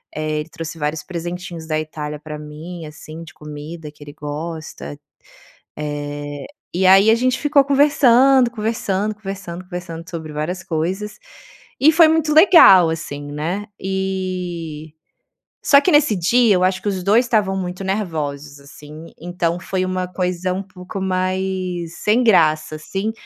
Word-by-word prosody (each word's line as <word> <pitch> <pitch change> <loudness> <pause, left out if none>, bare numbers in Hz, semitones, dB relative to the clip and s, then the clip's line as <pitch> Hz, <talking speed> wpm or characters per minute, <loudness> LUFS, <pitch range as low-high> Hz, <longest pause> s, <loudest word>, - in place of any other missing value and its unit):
Eh, 155 0 -2
ele 155 - -10
trouxe 165 0 -7
vários 150 0 -2
presentinhos 175 0 -6
da 155 -1 0
Itália 150 -1 -6
pra 150 0 -8
mim, 155 +3 -9
assim, 155 +2 -10
de 160 - -13
comida 150 +1 -9
que 150 0 -15
ele 145 - -10
gosta. 150 - -7 0.8
Eh, 145 -1 -5 0.3
e 185 +1 +2
aí 195 +3 +7
a - - +6
gente 255 +2 +1
ficou 290 -2 +3
conversando, 270 -2 +5
conversando, 215 -3 -2
conversando, 195 -4 -7
conversando 175 -2 -7
sobre 160 -3 -7
várias 170 +5 -3
coisas. 180 +6 -3 0.6
E 295 - +7
foi 330 0 +7
muito 315 -1 +1
legal 310 - +8
assim, 145 -3 -5
né? 170 +8 -3 0.2
Eh, 180 -5 -4 0.7
só 280 0 +6
que 360 - +1
nesse 295 -6 +4
dia, 210 +4 +3
eu 180 - +1
acho 185 0 +1
que - - -5
os 190 -2 -3
2 215 +6 +4
estavam 210 -5 +1
muito 180 0 -4
nervosos, 150 -8 -3
assim. 150 +3 -12
Então 175 0 -2
foi 185 +1 -2
uma 185 0 -2
coisa 180 0 -2
um 190 +2 -4
pouco 190 +1 -8
mais 185 -2 -2
sem 225 +4 +2
graça, 155 -7 +3
assim. 195 +8 -3
180 Hz, 150 wpm, -20 LUFS, 155-195 Hz, 0.8 s, legal